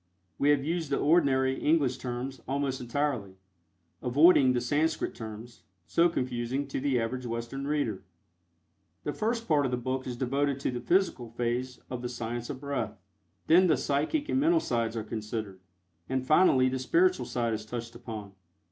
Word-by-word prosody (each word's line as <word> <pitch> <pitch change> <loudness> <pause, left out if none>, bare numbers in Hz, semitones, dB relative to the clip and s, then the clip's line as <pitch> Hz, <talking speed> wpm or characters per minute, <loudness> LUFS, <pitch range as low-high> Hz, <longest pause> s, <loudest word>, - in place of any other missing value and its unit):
We 140 - +3
have 145 -2 +4
used 165 0 -2
the 140 - +1
ordinary 135 -4 +3
English 145 -5 +2
terms, 125 +1 -5
almost 135 -1 -1
entirely, 125 -6 -2 0.7
avoiding 135 0 +5
the 125 - +1
Sanscrit 145 +6 0
terms, 110 +1 -9 0.2
so 170 +1 +3
confusing 130 -1 -2
to - - -2
the 135 -2 +1
average 125 +2 -3
Western 115 +4 -4
reader. 140 -10 -1 1.0
The 145 - -2
first 230 +1 -1
part 150 -3 +3
of 135 - 0
the 125 - -1
book 130 +2 -3
is 125 -1 -4
devoted 140 +2 0
to - - 0
the 120 -1 -4
physical 175 -10 +1
phase 120 +2 -2
of 125 -1 -4
the 125 - -3
Science 120 0 -4
of 140 -3 -5
Breath; 130 -7 -3 0.5
then 180 +3 +6
the 155 -5 +3
psychic 150 - 0
and 265 - +1
mental 330 +4 +4
sides 115 - -1
are 110 - -2
considered, 105 -3 -5 0.5
and 130 0 -1
finally 135 -4 +5
the 130 0 -1
spiritual 365 - +2
side 115 -2 -1
is 110 -1 -3
touched 115 +1 -6
upon. 110 -4 -8
130 Hz, 170 wpm, -29 LUFS, 120-145 Hz, 1.0 s, then